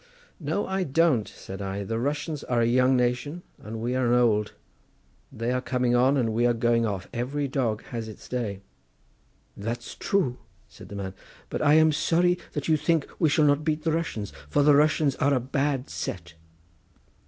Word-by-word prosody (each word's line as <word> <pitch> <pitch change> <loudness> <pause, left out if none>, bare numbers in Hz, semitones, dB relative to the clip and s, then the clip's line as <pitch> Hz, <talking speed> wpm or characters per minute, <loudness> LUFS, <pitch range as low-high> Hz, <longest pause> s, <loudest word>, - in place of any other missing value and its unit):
"No, 160 +5 -1
I 190 0 -1
don't," 145 - +2
said 95 +1 -9
I; 100 +1 -3
"the 115 +3 -2
Russians 145 +3 -2
are 120 -1 0
a - - +3
young 130 +2 +3
nation 125 +7 -1 0.2
and 110 +1 -7
we 120 +3 -1
are 130 -1 +1
an 125 - +5
old; 105 -3 +2 0.8
they 120 -1 -2
are 125 0 0
coming 125 -1 0
on 130 +3 +4
and 115 -4 +1
we 120 +2 +3
are 120 - +2
going 115 0 +2
off; 95 -3 -4
every 140 +4 -2
dog 120 -5 -1
has 115 -2 -3
its 110 - -11
day." 110 -6 -3 0.9
"That's 115 +3 -5
true," 140 -11 0 0.3
said - - -14
the 100 - -8
man, 95 -1 -5 0.4
"but - - -2
I 150 0 +5
am 160 0 +6
sorry 175 +4 +2
that 145 - -3
you 160 -1 +4
think 155 0 +1
we 160 - +4
shall 150 +1 +3
not 145 +1 +3
beat 155 -1 -1
the 165 - +1
Russians, 155 - -3 0.2
for 145 - +3
the 150 0 +6
Russians 150 -1 +3
are 140 +1 +2
a - - +2
bad 135 +1 -1
set." 85 -2 -5
125 Hz, 190 wpm, -26 LUFS, 115-150 Hz, 0.9 s, am